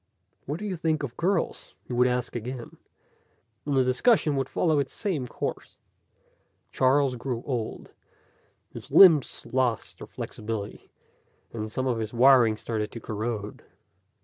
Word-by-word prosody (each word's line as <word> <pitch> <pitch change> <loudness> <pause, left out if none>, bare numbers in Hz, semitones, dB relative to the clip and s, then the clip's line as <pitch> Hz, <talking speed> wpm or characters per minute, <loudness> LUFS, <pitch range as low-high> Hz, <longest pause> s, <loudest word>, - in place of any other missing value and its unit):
"What 145 +3 -2
do 210 - -6
you 195 -3 -2
think 160 -2 -1
of 125 -4 -5
girls?" 180 0 -2
he - - -8
would 125 +1 +4
ask 125 0 -2
again, 120 +1 -6 0.9
and 140 -2 +1
the 130 - +5
discussion 150 - +2
would 135 -1 -1
follow 160 -4 +1
its 135 -2 -2
same 165 - -2
course. - - -5 0.9
Charles 135 0 +2
grew 120 -1 -4
old. 120 -5 -4 0.8
His - - -10
limbs 165 -9 +6
lost 125 -3 -1
their - - -9
flexibility, 105 -2 -6 0.6
and 110 -1 -5
some 130 +3 -2
of 120 -3 0
his 110 +1 -4
wiring 120 -3 +5
started 110 -1 -3
to 115 - -6
corrode. 110 -1 -5
125 Hz, 145 wpm, -26 LUFS, 115-145 Hz, 0.9 s, limbs